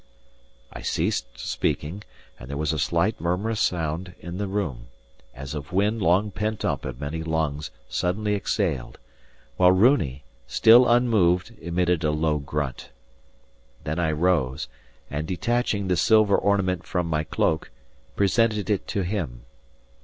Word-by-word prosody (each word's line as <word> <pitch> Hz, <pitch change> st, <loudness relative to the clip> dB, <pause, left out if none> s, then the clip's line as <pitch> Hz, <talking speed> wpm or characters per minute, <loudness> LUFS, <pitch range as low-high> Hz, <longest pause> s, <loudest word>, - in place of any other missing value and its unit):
I -, -, -8 dB
ceased -, -, -2 dB
speaking, 75 Hz, +8 st, -2 dB, 0.4 s
and 65 Hz, -, -10 dB
there 70 Hz, -, -4 dB
was 75 Hz, +1 st, 0 dB
a 80 Hz, -, -2 dB
slight 85 Hz, +8 st, 0 dB
murmurous 100 Hz, +6 st, -1 dB
sound 85 Hz, +1 st, -1 dB
in 90 Hz, +2 st, -7 dB
the 100 Hz, -, -1 dB
room, 80 Hz, -12 st, -3 dB, 0.5 s
as 70 Hz, +2 st, -7 dB
of 75 Hz, +2 st, -6 dB
wind 105 Hz, +4 st, +1 dB
long 95 Hz, +4 st, +3 dB
pent 105 Hz, +1 st, -2 dB
up -, -, -1 dB
in 65 Hz, -2 st, -6 dB
many 75 Hz, +4 st, -4 dB
lungs 80 Hz, -2 st, -2 dB, 0.2 s
suddenly 105 Hz, +4 st, -1 dB
exhaled; 70 Hz, -10 st, -1 dB, 0.6 s
while 90 Hz, 0 st, +6 dB
Runi, 95 Hz, -, +3 dB, 0.2 s
still 115 Hz, -, +6 dB
unmoved, 110 Hz, -5 st, +3 dB
emitted 85 Hz, 0 st, 0 dB
a 75 Hz, -, +2 dB
low 75 Hz, 0 st, +1 dB
grunt. 70 Hz, -1 st, -4 dB, 0.9 s
Then 75 Hz, +3 st, -2 dB
I 80 Hz, -2 st, +1 dB
rose, 75 Hz, -5 st, +1 dB, 0.4 s
and 75 Hz, +2 st, -3 dB
detaching 105 Hz, +1 st, 0 dB
the 90 Hz, -, +2 dB
silver 110 Hz, +3 st, +4 dB
ornament 95 Hz, -3 st, +1 dB
from 90 Hz, -1 st, -2 dB
my 80 Hz, -2 st, 0 dB
cloak, 80 Hz, 0 st, 0 dB, 0.5 s
presented 105 Hz, +1 st, +2 dB
it 100 Hz, -, -1 dB
to 100 Hz, -, -1 dB
him. 85 Hz, -, -3 dB
90 Hz, 140 wpm, -25 LUFS, 75-100 Hz, 0.9 s, while